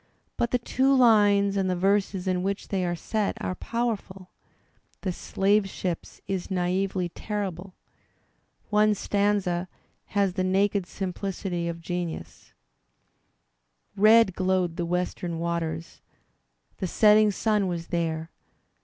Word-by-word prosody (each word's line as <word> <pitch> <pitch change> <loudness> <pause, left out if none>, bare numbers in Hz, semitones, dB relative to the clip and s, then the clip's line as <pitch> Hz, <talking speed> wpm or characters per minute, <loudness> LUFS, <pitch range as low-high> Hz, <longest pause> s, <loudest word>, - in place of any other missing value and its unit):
But 235 - 0
the 250 - +2
two 265 +3 +2
lines 205 -5 +5
and 190 -1 +1
the 180 - +1
verses 195 0 +1
in 180 -1 +1
which 195 +2 -3
they 190 -2 0
are 175 -1 -1
set 210 +4 -2
are - - -2
powerful. 200 -4 -4 0.7
"The 190 - -1
Slave 195 +3 +1
Ships" 180 -2 -5
is 190 -2 -3
naively 185 0 0
terrible. 195 -2 -5 1.0
One 210 0 +4
stanza 200 -3 0 0.5
has 195 -2 +2
the 185 - -1
naked 195 0 +1
simplicity 185 -2 -3
of 170 0 -5
genius: 175 -1 -5 1.4
Red 215 0 +6
glowed 185 -2 0
the 170 0 -2
western 180 -1 -2
waters 165 -1 -3 0.4
— - - -44
The 185 - -1
setting 215 +3 +5
sun 210 0 +1
was 170 -2 -4
there. 165 -1 -2
190 Hz, 125 wpm, -26 LUFS, 175-205 Hz, 1.4 s, Red